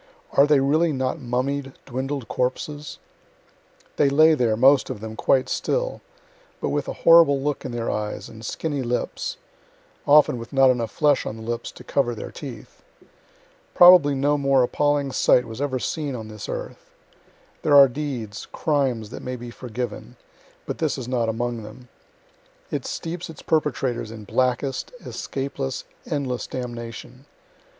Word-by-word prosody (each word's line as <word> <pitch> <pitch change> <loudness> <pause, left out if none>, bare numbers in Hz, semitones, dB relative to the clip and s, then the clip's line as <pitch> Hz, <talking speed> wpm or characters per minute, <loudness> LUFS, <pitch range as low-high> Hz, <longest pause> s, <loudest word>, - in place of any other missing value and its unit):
are 140 +1 +5
they 150 -2 +5
really 155 +5 +2
not 130 +2 -2
mummied, 135 +2 -2
dwindled 135 0 -4
corpses? 145 +4 -3 1.0
They 140 - +4
lay 155 +3 +6
there, 120 -7 +1
most 135 +3 +5
of 130 -5 -5
them, 110 +1 -7
quite 130 +3 +2
still, - - -1 0.6
but - - -2
with - - -1
a - - -3
horrible 165 -4 +7
look 145 +1 -2
in 130 - -4
their 120 -1 -2
eyes 105 0 -4
and 110 0 -12
skinny 145 +2 -3
lips 125 - -3 0.7
(often 145 -4 +5
with 115 +2 -9
not 135 -1 +6
enough 120 -3 -2
flesh 145 +1 +2
on - - -4
the 110 - -10
lips 120 +1 -4
to - - -12
cover 120 -4 0
their - - -7
teeth.) - - -10 0.9
Probably 175 -5 +8
no 145 +2 +1
more 135 -2 +3
appalling 145 +2 +1
sight 125 -1 +3
was 115 +3 -7
ever 140 -2 -1
seen 145 +1 -3
on 110 -2 -7
this 105 -1 -8
earth. - - -6 0.7
(There 145 - +3
are 140 -1 +10
deeds, 125 -6 -5
crimes, 130 -8 0
that - - -7
may 125 0 -4
be 120 -1 -8
forgiven; 120 - -6 0.5
but - - -5
this - - 0
is - - -6
not 120 -3 0
among 120 +1 -2
them. 110 +4 -12 0.8
It - - -3
steeps 170 +1 -5
its 160 - -11
perpetrators 135 -7 0
in 110 -1 -9
blackest, 130 +5 -1
escapeless, 135 -1 -4 0.2
endless 135 -5 -2
damnation. 120 +1 -7
130 Hz, 155 wpm, -23 LUFS, 120-145 Hz, 1.0 s, are